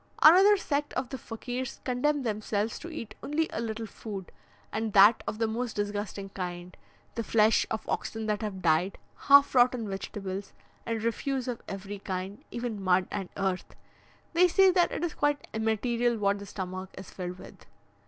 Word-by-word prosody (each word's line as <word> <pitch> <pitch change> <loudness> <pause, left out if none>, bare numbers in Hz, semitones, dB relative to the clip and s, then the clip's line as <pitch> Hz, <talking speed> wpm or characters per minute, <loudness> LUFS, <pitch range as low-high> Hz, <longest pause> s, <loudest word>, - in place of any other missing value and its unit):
Another 385 +6 +8
sect 290 -5 -2
of 255 0 -2
the 265 - -5
Fakirs 245 +3 -5
condemn 275 +3 +1
themselves 215 -1 -1
to 340 - -8
eat 230 -10 -7
only 315 +2 0
a 220 - -2
little 225 0 -3
food, 200 -3 -8 0.4
and 220 -1 -2
that 205 +3 +7
of 215 - -3
the 225 - +1
most 230 +1 -3
disgusting 205 -1 -3
kind: 180 -1 -6 0.4
the 230 - -3
flesh 220 0 +3
of 220 - -4
oxen 225 -1 -3
that 210 0 -1
have 195 -4 -4
died, 170 +3 +2 0.2
half 280 0 +6
rotten 245 -3 +4
vegetables, 195 0 -5 0.3
and 225 -1 -2
refuse 260 +3 -1
of 245 -2 -3
every 195 +1 -6
kind, 190 +1 -5
even 235 -4 -4
mud 185 -1 +3
and 195 -3 -4
earth; 190 -2 -2 0.6
they 355 +2 +6
say 380 +2 +5
that 355 -1 +3
it - - -3
is 345 - -1
quite 290 0 0
immaterial 230 +2 +1
what 200 -1 +1
the 200 - -9
stomach 185 -1 -5
is 190 - -9
filled 180 -1 -5
with. - - -14
220 Hz, 175 wpm, -29 LUFS, 195-250 Hz, 0.6 s, Another